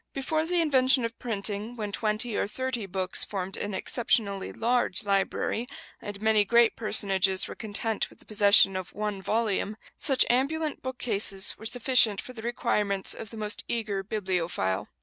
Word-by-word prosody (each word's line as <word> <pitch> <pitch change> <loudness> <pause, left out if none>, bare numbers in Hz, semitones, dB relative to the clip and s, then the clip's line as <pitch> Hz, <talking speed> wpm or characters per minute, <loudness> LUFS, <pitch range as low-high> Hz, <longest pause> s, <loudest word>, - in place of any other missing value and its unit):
Before 310 +4 -2
the 355 0 +1
invention 265 -4 +3
of 230 0 -7
printing, 210 0 -2
when 210 -3 -5
twenty 215 +2 -1
or - - 0
thirty 250 -2 -4
books 185 0 0
formed 190 -1 -3
an 205 -1 -4
exceptionally 200 -3 0
large 235 -4 +1
library, 200 +3 -1 0.3
and 205 -1 -7
many 215 -1 +3
great 235 +2 +3
personages 195 -3 +2
were - - -7
content 220 0 -2
with - - -19
the - - -20
possession 200 -2 +5
of 185 -1 -6
one 210 -1 -3
volume, 215 0 -1 0.2
such 270 -3 +3
ambulant 295 +5 0
bookcases 220 -6 -1
were 220 - -2
sufficient 240 -4 +4
for 255 - -8
the 225 - -9
requirements 210 -4 -1
of 220 - -8
the 225 - -10
most 210 0 -2
eager 215 -4 -2
bibliophile. 180 - -2
215 Hz, 160 wpm, -27 LUFS, 200-240 Hz, 0.3 s, possession